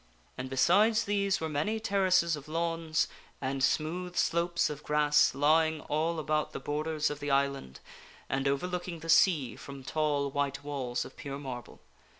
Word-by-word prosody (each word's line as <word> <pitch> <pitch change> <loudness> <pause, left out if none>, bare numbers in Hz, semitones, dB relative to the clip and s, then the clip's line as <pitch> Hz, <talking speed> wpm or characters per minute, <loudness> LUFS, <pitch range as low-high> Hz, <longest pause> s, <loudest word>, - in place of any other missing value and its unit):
And 130 0 -5
besides 205 - +4
these 200 -2 0
were 160 - -2
many 155 +9 -1
terraces 185 -6 +2
of 145 0 -10
lawns, 165 0 0 0.3
and 135 0 -2
smooth 175 +5 0
slopes 170 0 +1
of 150 0 -6
grass 150 0 +3
lying 155 +2 +3
all 160 +3 -1
about 155 -1 -1
the - - -4
borders 155 +1 -1
of 145 - -6
the 145 - -4
island, 140 - 0 0.5
and 135 +1 -1
overlooking 175 +4 -2
the 165 - -8
sea 160 -6 +4
from 140 -1 -10
tall 145 0 0
white 140 0 -2
walls 130 -4 -3
of - - -12
pure 140 -1 -6
marble. 130 -4 -8
155 Hz, 155 wpm, -30 LUFS, 140-170 Hz, 0.5 s, besides